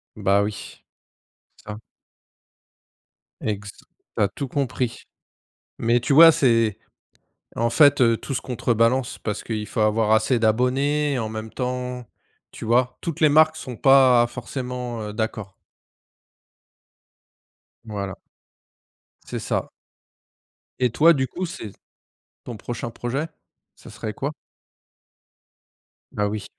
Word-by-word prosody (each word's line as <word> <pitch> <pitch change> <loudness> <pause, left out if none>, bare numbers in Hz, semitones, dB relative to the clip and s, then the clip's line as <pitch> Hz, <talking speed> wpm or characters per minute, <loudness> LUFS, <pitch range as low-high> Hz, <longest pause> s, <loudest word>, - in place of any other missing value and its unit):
Bah 100 -1 +2
oui, 105 0 -7 0.8
ça. 105 0 -7 1.6
Exa 100 -1 -4 0.5
tu - - +1
as - - +3
tout 140 +7 -6
compris, 130 -4 -2 0.7
mais 120 +1 +2
tu 125 - -2
vois? 165 +3 +10
C'est 115 -7 +2 0.8
en 115 +1 +1
fait, 145 +3 +5
heu, 115 -2 +5
tout - - -6
se - - 0
contrebalance 120 0 0
parce 105 -1 -4
qu'il 110 -2 -4
faut - - -2
avoir 110 0 +2
assez 110 +3 +3
d'abonnés 130 +5 +1
en 110 - -2
même 110 0 -6
temps. 125 -1 -4 0.5
Tu - - -10
vois? 120 +3 +1
Toutes 165 -3 -4
les 155 - +5
marques 155 +1 +4
sont 130 -5 -7
pas, 130 -1 +5
forcément, 125 -1 -5
heu, - - -8
d'accord. 110 -3 -4 2.3
Voilà. 100 -4 -5 1.1
C'est - - -5
ça. - - -2 1.1
Et 125 -1 +2
toi, 165 +8 +5
du 130 -3 -1
coup, 185 +6 -4
c'est 110 - -7 0.7
ton 120 - -7
prochain 120 +2 -6
projet, 130 +7 -3 0.5
ça - - -14
serait 110 -1 -6
quoi? 140 +7 -3 1.8
Bah 105 -1 -1
oui. 105 -1 -4
120 Hz, 120 wpm, -23 LUFS, 110-130 Hz, 2.3 s, vois